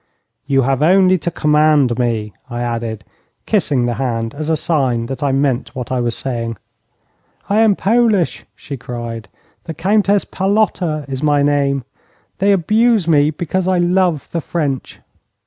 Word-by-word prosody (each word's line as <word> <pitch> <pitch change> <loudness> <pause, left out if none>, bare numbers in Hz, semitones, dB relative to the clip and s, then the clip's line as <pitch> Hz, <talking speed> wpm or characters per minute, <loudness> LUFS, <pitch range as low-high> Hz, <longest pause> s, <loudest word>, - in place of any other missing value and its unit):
'You 135 -2 +2
have 135 +1 0
only 185 +2 +4
to 165 - -2
command 150 -6 +2
me,' 110 -4 -1 0.2
I 120 -1 -4
added, 115 -2 -4 0.4
kissing 145 - +1
the 120 - 0
hand 115 -3 -2
as 155 +2 -5
a 160 - +2
sign 130 -8 0
that 135 +4 -6
I 140 -2 +1
meant 135 -2 -1
what 125 -2 -5
I 130 - 0
was 120 -1 -1
saying. 115 -4 -3 0.9
'I 210 - +3
am 220 -3 +4
Polish,' 215 -4 +1
she 140 - -8
cried; 120 -2 -6 0.4
'the 165 - -6
Countess 200 +4 +2
Palotta 190 -6 0
is 135 -1 -5
my 145 -2 +2
name. 140 -2 +1 0.6
They 200 +1 +3
abuse 215 +2 +2
me 150 -2 +4
because 175 +4 -2
I 185 -1 +2
love 175 -3 +1
the 170 - -2
French. 145 -6 -3
145 Hz, 155 wpm, -17 LUFS, 125-180 Hz, 0.9 s, only